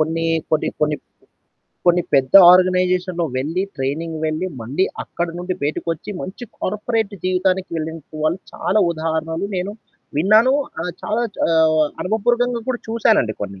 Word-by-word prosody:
కొన్ని 165 +1 0 0.3
కొన్ని 155 - +2
కొన్ని 150 0 +1
ప్ - - -38 0.8
కొన్ని 175 0 +5
పెద్ద 130 +2 +2 0.2
ఆర్గనైజేషన్‌లో 180 -1 +3
వెళ్ళి, 160 +8 -1
ట్రైనింగ్ 155 +5 -3
వెళ్ళి, 155 +4 -2
మళ్ళీ 135 +12 0 0.2
అక్కడి 170 -1 -4
నుండి 180 +1 -3
బయటకొచ్చి 165 +5 -3
మంచి 195 +6 -7
కార్పొరేట్ 210 +1 -1
జీవితానికి 185 +1 0
వెళ్ళిన 160 +1 -4 0.2
వాళ్ళు 155 +4 +1
చాలా 215 - 0
ఉదాహరణలు 160 +2 -2
నేను 185 +3 -2 0.4
విన్నాను. 215 - +5 0.3
ఆహ్ 180 +1 -3
చాలా 220 +3 -1
చ్ - - -15
ఆహ్, 160 -1 +4 0.2
అనుభపూరకంగా 240 +4 +1
కూడా 250 -2 0
చూశానండి 220 - +2
కొన్ని. 100 -1 -6
180 Hz, 135 wpm, -20 LUFS, 160-195 Hz, 0.8 s, కొన్ని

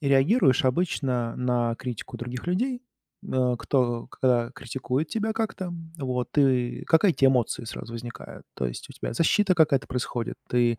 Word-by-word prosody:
реагируешь 140 - +4
обычно 130 -5 0
на 120 -2 +1
критику 125 -3 -6
других 125 +3 -6
людей, 245 +8 0 0.4
э, 125 -1 +1
кто 120 -3 0
к 120 -2 +1
критикует 130 +3 -3
тебя 220 0 -1
как-то, 215 -5 -3 0.3
вот, 125 -2 -3
и 130 -3 +2
какая 170 +3 +4
тебя 135 -3 +4
эмоция 120 -2 0
сразу 115 - -7
возникает? 115 0 -8
То 65 - -1
есть - - -7
у - - -9
тебя - - -5
защита 185 - +3
какая-то 150 -5 +3
происходит, 120 -2 -3
ты 120 -2 +2
130 Hz, 150 wpm, -26 LUFS, 120-160 Hz, 0.4 s, реагируешь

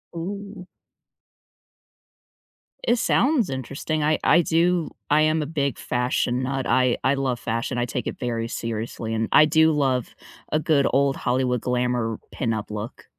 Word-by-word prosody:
Ooh. 195 +2 -6 2.2
It 240 - +3
sounds 255 - +2
interesting. 140 +4 -3
I 155 +1 +2
I 170 - +5
do 170 0 +1 0.2
I 150 +1 +5
am 155 +1 +2
a - - -4
big 140 -3 -2
fashion 125 0 -1
nut, 135 0 -2
I 125 0 +3
I 130 - +3
love 135 -3 -1
fashion, 115 +3 -2
I 120 - +1
take - - -4
it - - -4
very 115 -2 -2
seriously, 115 0 -4
and 110 0 0
I 155 - +7
do 160 +1 +4
love 135 -5 0 0.4
a 155 - +2
good 150 -3 +2
old 140 +1 +2
Hollywood 125 -1 0
glamour 125 -3 -1
pin-up 110 -4 -3
look. 105 +2 -6
130 Hz, 150 wpm, -24 LUFS, 120-155 Hz, 2.2 s, I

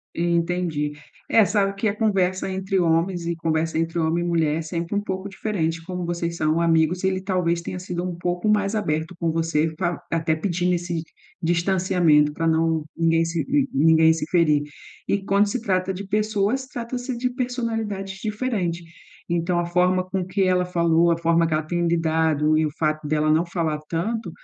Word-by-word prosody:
Entendi. 170 -3 0 0.4
Eh, 225 - +5
sabe 195 0 +1
que 200 +3 -1
a 205 - 0
conversa 195 -4 +1
entre 190 0 -1
homens 170 +1 +1
e 170 0 -1
conversa 160 0 -1
entre 165 +1 -2
homem 165 +1 +1
e - - -2
mulher 160 -3 +1
é - - -2
sempre 170 +3 -4
um 205 - +1
pouco 190 -1 -4
diferente, 170 -5 -2
como 180 0 -4
vocês 170 0 -2
são 155 +1 +1
amigos, 165 +2 +2
ele 190 0 +1
talvez 180 -3 0
tenha 180 +2 -5
sido 180 -1 -4
um 180 -1 -3
pouco 175 +3 -2
mais 210 0 +2
aberto 160 -4 -2
com 165 -1 0
você 160 -1 0
fa 175 -2 -1
até 160 -1 +1
pedindo 180 +1 0
esse 175 -1 -3 0.4
distanciamento 170 -3 +3
para 165 +2 -3
não 160 -1 +1
ninguém 165 0 +2
se 165 0 -1
nin 280 0 +2
ninguém 160 +2 +5
se 160 -1 -4
ferir 155 -5 +3 0.5
e 200 -1 0
quando 200 +1 +3
se 230 +5 -2
trata 185 -3 0
de 190 +2 -6
pessoas, 215 +5 0
trata-se 245 +1 -5
de 250 +1 -1
personalidades 225 -6 -3
diferente. 210 -6 -2 0.5
Então 170 +1 0
a 175 - 0
forma 180 +1 +2
com 185 0 -3
que 190 +2 0
ela 185 -1 +2
falou, 170 -1 +2
a 170 - +2
forma 170 0 +2
que 160 - -1
ela 155 +1 +1
tem 175 +2 -1
lidado 160 -2 +2
e 155 - +2
o - - -1
fato 155 -1 -1
dela 155 0 +2
não 160 +3 +3
falar 165 -3 -2
tanto, 195 +5 -2
175 Hz, 185 wpm, -23 LUFS, 165-190 Hz, 0.5 s, Eh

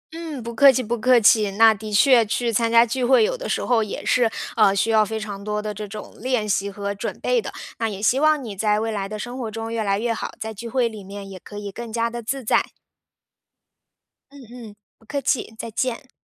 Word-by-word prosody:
嗯， 320 -6 -6
不 235 +1 -6
客 275 +4 +7
气 255 -1 -1
不 235 +2 -2
客 250 +1 +5
气。 210 -1 +5
那 220 +2 +6
的 215 +1 -8
确 235 +3 +5
去 230 +2 -1
参 230 +1 +1
加 235 0 +6
聚 250 +2 -2
会， 260 - +5
有 - - 0
的 - - -6
时 - - -1
候 235 -3 +3
也 210 - -6
是， 245 -3 +3 0.3
呃， 205 -3 +5
需 215 +3 +1
要 220 -1 +5
非 220 +1 -4
常 205 -2 -7
多 210 0 -2
的 210 0 -4
这 210 +1 -7
种 210 +1 -9
练 245 -3 -1
习 200 0 0
和 200 0 -4
准 200 - -5
备 - - +1
的， - - -6 0.3
那 225 -1 0
也 200 -2 -6
希 240 +6 +2
望 310 -2 +3
你 215 -4 -7
在 210 +1 +1
未 225 +1 -2
来 200 -2 -3
的 215 - -5
生 240 +4 -6
活 230 -3 -3
中 225 +1 -5
越 225 - -1
来 200 -1 +1
越 230 +2 -1
好， - - -4
在 220 0 -5
聚 230 +3 -8
会 250 -1 +1
里 215 -3 -8
面 200 +1 -9
也 190 -1 -9
可 205 - -11
以 205 -1 -6
更 235 +2 -8
加 230 +1 -1
地 240 0 -5
自 265 +4 -4
在。 220 - +3 1.7
嗯 285 - -13
嗯， 235 -4 -11 0.2
不 220 - -25
客 280 +4 -3
气， 235 -5 -1
再 230 - -6
见。 255 +3 -3
225 Hz, 265 characters per minute, -22 LUFS, 210-245 Hz, 1.7 s, 客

